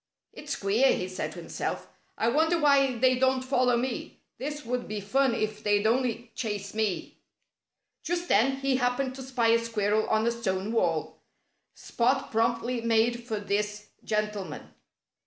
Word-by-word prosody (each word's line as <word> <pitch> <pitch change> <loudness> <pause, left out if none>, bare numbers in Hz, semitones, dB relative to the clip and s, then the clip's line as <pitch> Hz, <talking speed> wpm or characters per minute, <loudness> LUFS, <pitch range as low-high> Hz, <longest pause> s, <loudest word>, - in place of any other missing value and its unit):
"It's - - -5
queer," 215 +7 +3
he 180 - -3
said 185 - -4
to - - -8
himself. - - -4 0.3
"I 225 - +1
wonder 320 +6 +2
why 275 -4 +4
they 255 +1 +3
don't 260 0 +2
follow 255 -2 +2
me. 250 0 -3 0.2
This 295 +3 -5
would 250 +1 -2
be 210 0 -4
fun 255 +5 +1
if 215 -1 -2
they'd 205 0 +2
only 235 0 0
chase 205 -3 -4
me." 215 -4 -2 0.8
Just 350 +1 -2
then 255 +4 +3
he 270 -1 +2
happened 255 +1 0
to 265 - -8
spy 250 -3 0
a 230 0 +5
squirrel 215 -2 0
on 220 0 +2
a 235 - +3
stone 205 -3 -2
wall. 230 - 0 0.6
Spot 255 +3 0
promptly 235 +2 0
made 230 +1 +1
for 220 -3 -2
this 210 +1 -2
gentleman. 210 -2 -3
235 Hz, 155 wpm, -28 LUFS, 215-260 Hz, 0.8 s, a